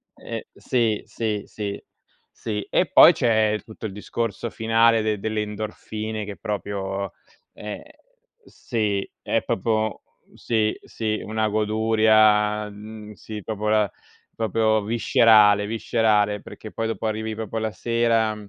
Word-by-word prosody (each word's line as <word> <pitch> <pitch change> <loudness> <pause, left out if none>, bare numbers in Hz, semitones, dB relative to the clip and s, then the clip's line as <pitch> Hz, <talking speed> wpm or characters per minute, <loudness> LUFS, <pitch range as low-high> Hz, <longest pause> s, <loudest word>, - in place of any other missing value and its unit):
ehm, - - -6
sì, 115 -4 0
sì, 105 -3 -3
sì, 100 -2 -5 0.5
sì. 105 -3 -4
E - - +3
poi - - +9
c'è 110 -2 +2
tutto 110 0 -10
il - - -8
discorso 115 +2 -3
finale 115 -2 +2
delle 110 +1 -2
endorfine 110 +1 -5
che 100 -1 -7
proprio 100 -2 -4 0.4
ehm 105 0 -7 0.6
sì, 105 -5 -2
è - - 0
proprio 110 0 -1 0.4
sì, 110 -2 0
sì, 110 -1 -3
una 110 0 -1
goduria, 110 -1 +3
mhmm 105 +1 -10
sì, 105 +2 -8
proprio 105 -1 -3
la 105 -2 +2 0.4
proprio 110 0 +1
viscerale 105 -2 +5
viscerale, 110 -2 +1
perché 110 - -10
poi 115 0 -2
dopo 115 0 -4
arrivi 110 0 -2
proprio 110 0 -4
la 110 -1 -2
sera 115 -2 +1
110 Hz, 125 wpm, -23 LUFS, 105-110 Hz, 0.6 s, poi